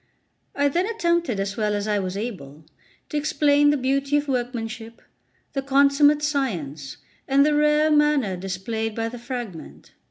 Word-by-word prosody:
I 285 0 +2
then 345 +7 0
attempted, 340 - 0
as 195 +1 -2
well 210 -2 0
as 205 +1 -3
I 210 -1 +1
was 185 0 -4
able, 155 - -7 0.4
to 300 - -2
explain 290 -1 +3
the 295 - +2
beauty 275 +2 0
of 290 0 -2
workmanship, 240 -3 -4 0.5
the 275 - -1
consummate 280 +2 +3
science, 170 - -3 0.3
and 275 +1 +4
the 300 - +2
rare 300 +1 +3
manner 295 -9 +2
displayed 195 +4 -4
by 225 0 -2
the 245 +1 -9
fragment. 240 - -8
255 Hz, 155 wpm, -23 LUFS, 210-290 Hz, 0.5 s, and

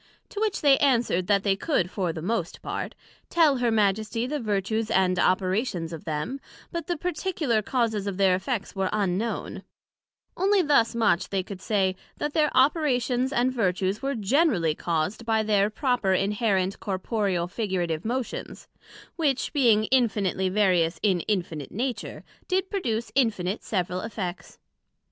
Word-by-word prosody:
To 410 - -6
which 430 -2 0
they 280 -2 +5
answered, 240 -10 +2
that 200 -1 +3
they 195 -2 +2
could, 195 - 0
for 185 -4 -1
the 160 -1 -7
most 190 -3 -2
part, - - -4 0.3
tell 315 -5 +4
her 245 -1 +1
Majesty 215 +1 +1
the 295 +3 -2
vertues 215 0 -1
and 185 -1 +2
operations 185 -2 0
of 160 - -8
them, 160 - -3 0.3
but 335 -2 -4
the 350 - -1
particular 310 - -1
causes 220 -3 -1
of 195 -2 -3
their 195 -2 +4
effects 205 +2 -3
were 190 -1 0
unknown; 205 +2 -2 0.7
onely 390 0 +3
thus 280 -7 +3
much 210 -6 +2
they 195 -2 -1
could 190 0 -9
say, 190 -3 +1 0.2
that 295 0 -3
their 305 -2 +3
operations 260 -3 +2
and 255 -1 +1
vertues 190 -3 0
were 275 +1 -1
generally 215 - +2
caused 170 +7 -2
by 220 -1 +1
their 205 -1 +2
proper 235 -4 0
inherent, 195 -1 0
corporeal, 190 -2 -1
figurative 180 -5 -2
motions, 245 +2 -4 0.5
which 280 -5 0
being 235 -7 +4
infinitely 205 -7 +2
various 180 -4 +2
in 190 -4 +3
Infinite 170 -8 -2
Nature, 240 0 -4 0.2
did 380 0 0
produce 235 - -2
infinite 210 -7 +1
several 180 -2 -2
effects. 195 -5 -6
215 Hz, 150 wpm, -26 LUFS, 185-255 Hz, 0.7 s, they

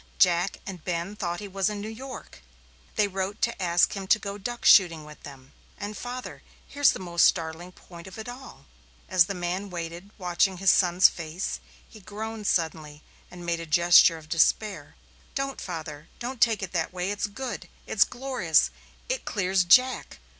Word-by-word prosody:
Jack 180 +1 +3
and 180 -5 -8
Ben 175 +3 -3
thought 175 -3 -3
he 205 - -6
was 195 +1 0
in 210 -1 -5
New 205 - -6
York. 250 - -9 0.5
They 210 - +3
wrote 195 +2 -4
to 235 -4 0
ask 175 -1 +3
him 195 -1 -6
to 215 - +5
go 200 -1 -6
duck 240 +4 -5
shooting 165 -6 +6
with 150 -1 -13
them. 135 -2 -13 0.2
And, 205 +1 -6
father 250 +2 -7 0.3
here's 285 -1 +4
the - - -5
most 170 -2 +2
startling 165 +1 -2
point 170 -1 -13
of 190 - -11
it 220 - -7
all." 250 +2 -10 0.4
As 185 -2 +4
the 200 - -5
man 180 +3 -3
waited, 170 +2 -6
watching 180 0 +1
his 195 +1 +5
son's 180 -1 +5
face, 165 +2 -5 0.3
he 220 - -14
groaned 215 +1 -6
suddenly 155 -3 -1 0.3
and 175 -1 -10
made 170 -1 -1
a 165 - -7
gesture 170 +1 +6
of 155 -1 -14
despair. 165 +1 +1 0.4
"Don't, 275 0 -3
father 155 -3 -7
don't 250 0 -6
take 225 -4 +3
it 195 - -5
that 165 -3 -1
way. 180 +2 -3
It's 205 +1 -2
good 250 +4 -6 0.2
it's 205 - +4
glorious 245 - +1 0.4
it - - -2
clears 190 -2 +1
Jack. 255 +9 +3
185 Hz, 180 wpm, -26 LUFS, 170-210 Hz, 0.5 s, shooting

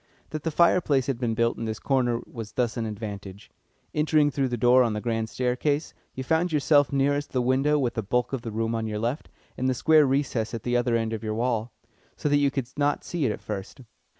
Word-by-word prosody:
That 155 - -4
the 160 - -1
fireplace 160 -5 +3
had 130 -3 -2
been 115 -3 -1
built 115 +1 +1
in 115 - -3
this 110 -1 -3
corner 125 -3 0
was 110 -3 -8
thus 120 -3 0
an 115 -2 -2
advantage. 105 -2 -7 0.4
Entering 150 -1 +3
through 135 -1 0
the 120 -1 -3
door 125 +2 +5
on 115 -3 +2
the 105 - -2
grand 115 -1 -2
staircase, 130 +6 -1 0.2
you 130 - -4
found 160 +5 +1
yourself 145 -1 +3
nearest 145 +1 0
the 130 - +1
window 135 +4 +2
with 125 -5 0
the 115 - -2
bulk 125 +5 -1
of 135 - -2
the 115 - -5
room 115 +1 -1
on 115 -1 -2
your 105 -1 -3
left, 120 +7 -3 0.3
and 130 +1 +1
the 130 - +1
square 155 +2 +5
recess 130 -5 -1
at 115 - -6
the 120 0 0
other 120 -1 +2
end 115 -1 -1
of 110 - -5
your 110 -1 -2
wall, 115 -1 -1 0.5
so 150 - -1
that 145 - +4
you 140 -1 +3
could 135 -3 -3
not 145 0 +1
see 165 -6 -1
it - - 0
at - - -6
first. 105 +5 -6
125 Hz, 235 wpm, -26 LUFS, 115-145 Hz, 0.5 s, door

